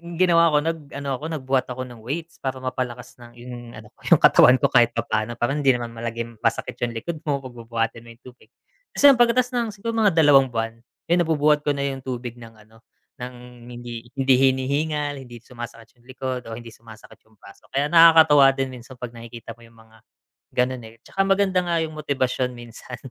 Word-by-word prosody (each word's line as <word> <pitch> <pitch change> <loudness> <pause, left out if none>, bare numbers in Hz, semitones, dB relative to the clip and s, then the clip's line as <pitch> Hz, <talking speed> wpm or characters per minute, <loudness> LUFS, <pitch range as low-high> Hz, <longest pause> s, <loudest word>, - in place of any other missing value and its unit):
ginawa 170 -1 +4
ko 150 - +3
nag 165 0 -2 0.2
ano 140 -1 -5
ako, - - -14 0.2
nagbuhat 130 0 0
ako 130 0 -5
ng 120 -3 -11
weights 160 +8 -6
para 130 -1 -3
mapalakas 125 -1 -5
ng 120 0 -13
yung 120 +1 -9 0.2
ano - - -13 0.2
yung - - +9
katawan 125 - +7
ko 140 - +3
kahit 120 -2 +4
papaano, 115 0 -2
parang 135 +5 -1
hindi 135 -3 +4
naman 120 -1 -5
palaging 115 0 -6
masakit - - -2
yung 120 -1 -2
likod 155 +7 -5
mo 140 -2 -1
'pag 130 - -8
bubuhatin 115 -1 -3
mo 115 - -12
yung - - -36
tubig. 125 -3 -16 0.5
Tapos - - -2
ayun 250 - +1
pagkatapos 245 +1 +3
ng 230 - -1 0.2
mga 220 -3 +3
dalawang 145 -4 +6
buwan, 115 -1 -4 0.3
ayun 175 - +4
nabubuhat 150 -1 +2
ko 145 - +2
na 140 - -2
yung 135 -1 -3
tubig 125 -2 -6
ng 115 -1 -13
ano 110 +1 -22 0.4
ng 125 -1 -10
hindi 120 -1 -8
hindi 135 -1 +4
hinihingal, 145 +2 -2
hindi 120 -2 -11
sumasakit 120 0 -11
yung - - -28
likod, 130 -2 -5
o 115 - -6
hindi 115 -1 -11
sumasakit 110 -1 -16
yung 110 - -28
braso 100 - -17
ko, - - -5
kaya 140 - +2
nakakatuwa 160 -4 +7
din 135 -1 -2
minsan 125 +1 -12
'pag 120 -1 -7
nakikita 115 0 -10
mo 120 - -23
yung 115 0 -18
mga 110 0 -20 0.6
ganun, 125 0 0
eh, 110 +1 -13
'tsaka 195 - -2
maganda 195 -1 +2
nga 170 -1 -1
yung 155 - -9
motibasyon 130 -4 -2
minsan 120 +1 -10
125 Hz, 205 wpm, -23 LUFS, 120-145 Hz, 0.6 s, yung